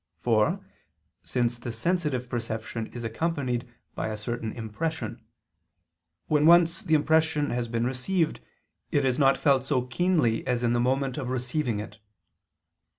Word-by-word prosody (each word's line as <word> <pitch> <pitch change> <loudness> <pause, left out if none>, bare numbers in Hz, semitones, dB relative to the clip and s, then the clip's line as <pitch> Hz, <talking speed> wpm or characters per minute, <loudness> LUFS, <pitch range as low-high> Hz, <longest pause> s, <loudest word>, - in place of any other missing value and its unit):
For, 110 -3 +1 0.6
since 120 -1 0
the 120 0 -5
sensitive 140 0 -1
perception 115 -1 -4
is 120 - -8
accompanied 125 -1 -2 0.2
by - - -3
a 110 -1 -3
certain 110 +1 -4
impression; 155 +9 -4 1.0
when 150 0 +3
once 170 0 +6
the 160 - +2
impression 155 -1 +2
has 120 -1 -1
been 115 0 -1
received 155 +7 0 0.5
it 140 -2 +1
is 130 0 +1
not 135 -1 +5
felt 135 -4 +3
so 135 -2 +1
keenly 130 -3 +1
as 125 -1 0
in 120 0 +2
the 120 - +2
moment 130 +1 0
of 125 - -4
receiving 125 -2 -1
it. 105 0 -8
125 Hz, 145 wpm, -27 LUFS, 120-150 Hz, 1.0 s, once